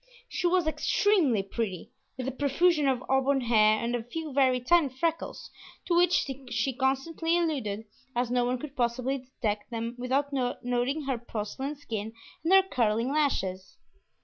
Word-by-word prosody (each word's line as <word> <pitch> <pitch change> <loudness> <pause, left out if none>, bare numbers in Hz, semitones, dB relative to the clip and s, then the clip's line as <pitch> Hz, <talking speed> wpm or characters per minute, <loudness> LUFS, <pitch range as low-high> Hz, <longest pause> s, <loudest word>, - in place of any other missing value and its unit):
She 355 - -1
was 355 -1 +2
extremely 315 - +2
pretty, 195 -3 -4 0.3
with 255 -1 -4
a - - 0
profusion 290 +3 +2
of 260 -2 +1
auburn 265 +1 +2
hair, 215 -3 +4
and 235 +2 -1
a 240 - -2
few 300 +6 -6
very 260 -2 +3
tiny 295 +4 +3
freckles, 325 +6 -3 0.3
to 345 - +1
which 355 0 +4 0.2
she 245 +3 0
constantly 275 +6 0
alluded, 250 -11 -1 0.3
as 245 0 0
no 245 0 +2
one 250 +1 0
could 280 +2 -8
possibly 255 +2 0
detect 225 -5 -4
them 230 0 -3
without 275 +3 0
noting 250 +2 -1
her 265 -3 -2
porcelain 240 +5 -4
skin 220 -6 -5 0.3
and 330 - 0
her 385 0 +8
curling 230 - 0
lashes. 195 -11 -1
260 Hz, 155 wpm, -28 LUFS, 235-295 Hz, 0.3 s, her